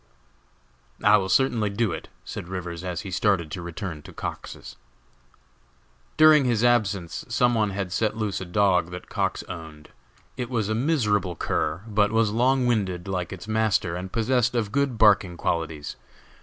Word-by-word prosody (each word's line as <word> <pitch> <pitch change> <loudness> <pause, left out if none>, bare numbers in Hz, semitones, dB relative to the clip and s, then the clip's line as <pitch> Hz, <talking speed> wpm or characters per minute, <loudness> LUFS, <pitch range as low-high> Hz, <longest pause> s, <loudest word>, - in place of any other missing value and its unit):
"I 105 0 +7
will 95 -2 -2
certainly 115 -1 +2
do 105 0 0
it," 80 - -6 0.2
said - - -6
Rivers, 90 -2 -5
as 90 0 -3
he 100 -3 -7
started 90 -4 +1
to 95 - -5
return 85 -2 -6
to - - -12
Cox's. - - -7 1.4
During 155 -2 +7
his 120 -2 +1
absence 100 -8 +1
some 120 +1 +2
one 110 -3 +1
had 95 -2 -4
set 110 +2 0
loose 105 -4 -2
a - - -4
dog 90 -1 +2
that 90 0 -9
Cox - - -1
owned. 80 -3 -9 0.5
It 125 -2 -3
was 110 -5 -1
a - - +1
miserable 110 - +1
cur, 80 +3 -2
but 105 -1 +2
was 110 -1 +2
long 125 +3 +2
winded, 100 -7 0
like 90 -2 -3
its 95 +1 -8
master, 110 -5 +1
and 90 +1 -6
possessed 120 +1 +1
of 110 -4 -1
good 140 -2 0
barking 100 -5 +4
qualities. 80 -4 -3
105 Hz, 165 wpm, -25 LUFS, 90-115 Hz, 1.4 s, I